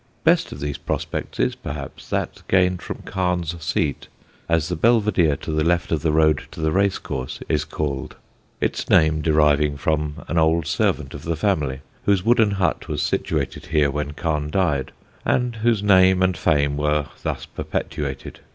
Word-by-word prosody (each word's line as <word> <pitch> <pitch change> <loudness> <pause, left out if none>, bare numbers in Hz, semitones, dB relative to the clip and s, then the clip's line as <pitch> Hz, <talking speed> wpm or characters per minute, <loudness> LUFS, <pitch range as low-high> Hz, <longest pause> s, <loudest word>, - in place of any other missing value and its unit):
Best - - +3
of - - -7
these 70 -1 -3
prospects - - -4
is, 60 +1 +2
perhaps, 70 -2 -8
that - - -2
gained 90 -1 +2
from - - -7
Carne's 90 -3 -1
seat, 75 -2 -1 0.4
as 80 -1 +2
the 90 - -2
Belvedere 100 -6 +3
to 80 - -6
the 75 0 +1
left 85 +1 +1
of 80 -3 +1
the 80 -1 +1
road 80 -1 +3
to - - -11
the 80 0 +1
racecourse 95 -9 -1
is 75 -1 +1
called; 70 -4 -4 0.4
its - - -2
name 80 -1 +4
deriving 75 -2 +3
from 75 0 -2
an 85 - +1
old 80 0 +3
servant 65 - 0
of - - -7
the 85 0 -2
family, 75 -7 0 0.2
whose 100 -2 +2
wooden 115 -2 +4
hut 95 -4 -1
was - - -2
situated 75 +1 -2
here 75 -3 +2
when 75 0 -3
Carne 75 -2 -2
died, 75 -7 0 0.3
and 125 -2 0
whose 110 -2 +1
name 95 -2 +5
and 95 -1 +2
fame 70 -3 +1
were 75 0 +1 0.2
thus - - -3
perpetuated. 70 -3 -4
80 Hz, 170 wpm, -22 LUFS, 75-90 Hz, 0.4 s, name